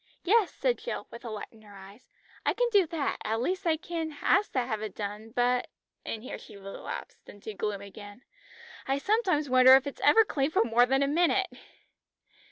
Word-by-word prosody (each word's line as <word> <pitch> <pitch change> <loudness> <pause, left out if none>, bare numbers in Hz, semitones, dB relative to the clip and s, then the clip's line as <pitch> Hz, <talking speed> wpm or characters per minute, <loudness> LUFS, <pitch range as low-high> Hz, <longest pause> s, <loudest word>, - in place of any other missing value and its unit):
"Yes," 420 +1 +3
said - - -1
Jill, - - -5
with 235 - -10
a 235 - -6
light 215 -2 -6
in 220 - -19
her 205 -2 -15
eyes; 195 +4 -14 0.3
"I - - +1
can - - +2
do 400 -5 +4
that, 310 -4 -2
at 220 +1 -1
least 370 +9 -2
I 320 -1 +3
can 325 -3 -5
ask 410 +1 +3
to 255 - +2
have 225 -3 -3
it 215 -3 -6
done, 210 +1 -6
but 245 +1 0 0.2
" - - -58
and 220 -1 -4
here 255 - -7
she - - -13
relapsed 195 0 -8
into 205 +1 -9
gloom 205 0 -3
again. 205 +3 -11 0.6
"I 270 +1 +1
sometimes 370 -3 +1
wonder 255 0 +8
if 270 +1 +3
it 280 - -6
is - - -8
ever 450 -1 +6
clean 275 -7 0
for 315 - +2
more 235 +2 +3
than 270 +2 +2
a - - +1
minute!" 350 +6 +2
255 Hz, 210 wpm, -28 LUFS, 215-335 Hz, 0.6 s, wonder